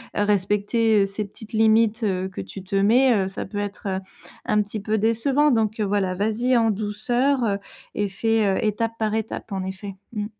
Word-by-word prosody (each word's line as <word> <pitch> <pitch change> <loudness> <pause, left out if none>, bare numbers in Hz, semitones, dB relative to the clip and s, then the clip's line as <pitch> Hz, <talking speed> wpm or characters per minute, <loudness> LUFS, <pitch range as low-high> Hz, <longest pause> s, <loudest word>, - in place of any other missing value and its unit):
à 205 - +2
respecter 210 +2 +2
ces 195 +2 -3
petites 215 +2 -13
limites, 220 +1 +3
heu, 190 -2 0
que 190 - -6
tu 195 0 -9
te 190 +1 -4
mets, 235 +6 +4
heu, - - -3
ça 190 - -5
peut 205 +2 -5
être, 205 0 -5
heu, 190 -1 -1 0.5
un 210 - +2
petit 205 +1 -6
peu 215 +2 0
décevant 260 +7 +2
donc 220 -2 +1
voilà. 195 -2 0
Vas-y 220 +6 +1
en 225 -1 +3
douceur 220 +2 0 0.3
et 205 -1 -1
fais, 225 +3 +1
heu, 195 - +1
étape 225 +2 0
par 215 -1 -1
étape, 220 0 -4
en 190 -1 -2
effet. 190 +1 -6 0.2
Mmh. 210 -2 -2
210 Hz, 190 wpm, -23 LUFS, 200-225 Hz, 0.5 s, mets